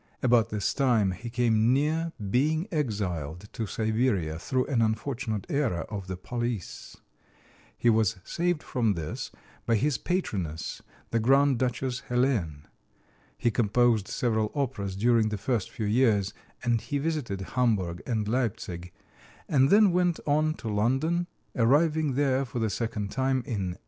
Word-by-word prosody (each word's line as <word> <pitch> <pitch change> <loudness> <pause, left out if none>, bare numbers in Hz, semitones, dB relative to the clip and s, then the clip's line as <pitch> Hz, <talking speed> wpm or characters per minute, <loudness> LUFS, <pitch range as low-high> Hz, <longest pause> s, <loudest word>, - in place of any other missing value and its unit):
About 120 -3 +4
this 105 -3 -1
time 120 -8 +2
he 115 +6 -6
came 115 -1 +3
near 160 +4 +1 0.2
being 155 - +2
exiled 100 - -2
to 110 - -3
Siberia 110 -8 0
through 130 +7 0
an 130 -5 +1
unfortunate 110 -1 -1
error 130 - 0
of 100 -2 -5
the 95 -1 -4
police. 120 -1 -5 0.8
He - - 0
was 110 -2 +4
saved 175 -2 -1
from 115 -5 +1
this 80 -2 -4 0.4
by 115 - +4
his 130 +2 +1
patroness, 95 - -3 0.3
the 115 - +2
Grand 135 +2 +4
Duchess 125 0 -1
Helene. 115 - 0 0.7
He 120 - +1
composed 115 -1 +2
several 110 -3 0
operas 115 -9 -2
during 115 +1 +3
the 105 -1 -3
next 120 -7 0
few 110 - -4
years; 105 -3 +2 0.3
and 120 -2 +1
he 145 - -2
visited 140 -10 -2
Hamburg 105 -9 +1
and 110 -4 -1
Leipzig 95 -7 -2 0.6
and 135 -2 +4
then 205 0 +6
went 175 -1 +1
on 155 +1 +2
to - - -8
London, 135 +12 +1 0.3
arriving 150 +4 +3
there 135 -1 +2
for 125 - -6
the 110 -3 0
second 105 -1 -3
time 130 -1 0
in 100 -8 -3
1857. - - -36
120 Hz, 145 wpm, -28 LUFS, 105-135 Hz, 0.8 s, then